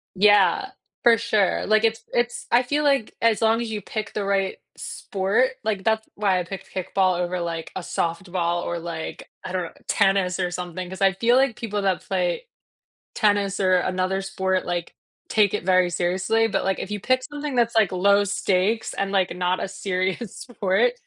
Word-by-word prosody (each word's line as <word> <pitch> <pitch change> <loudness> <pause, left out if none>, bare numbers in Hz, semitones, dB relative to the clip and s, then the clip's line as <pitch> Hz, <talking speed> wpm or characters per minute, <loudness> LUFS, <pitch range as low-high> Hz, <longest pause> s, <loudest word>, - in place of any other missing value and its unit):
Yeah, 205 - +4 0.3
for 235 -1 +6
sure, 210 -3 +1
like, 215 +1 +3
it's 225 0 +1
it's 240 0 -1
I 245 +2 +5
feel 295 +4 0
like 275 -6 +1
as 230 -1 +3
long 225 +1 +3
as 235 - -3
you 210 -1 -3
pick 215 -2 -5
the 210 - -2
right 195 -1 0 0.2
sport 200 +7 0
like, 210 -3 -1
that's 220 +1 +1
why 195 -3 +2
I - - -1
picked 190 +2 -9
kickball 185 -1 +1
over, 180 0 -1
like, 165 -1 -4
a 185 - -3
softball 175 0 -2
or 170 - -3
like, 165 -1 -6
I - - -6
don't 185 -1 -1
know, 165 - -7 0.2
tennis 195 -2 +2
or 180 -1 0
something, 180 0 -5
'cause 190 +1 -9
I 195 -1 +4
feel 235 +5 +2
like 265 -3 +3
people 210 -3 -3
that 190 -2 +1
play - - -1 0.7
tennis 205 -2 +1
or 185 -1 +4
another 185 +1 0
sport, 190 -1 -1
like, 175 -1 -3 0.3
take 210 -3 +3
it 210 - -4
very 185 -1 +4
seriously, 190 +6 +1
but 210 - -1
like, 190 0 0
if 205 - -6
you 210 - -2
pick 255 +5 +1
something 290 0 -5
that's, 235 -1 +2
like, 215 -5 +4
low 200 +2 +4
stakes 200 +2 0
and, 195 0 -2
like, 190 -3 +1
not 180 0 0
a - - -2
serious 190 +2 -3
sport, 235 - +1
195 Hz, 190 wpm, -24 LUFS, 185-225 Hz, 0.7 s, for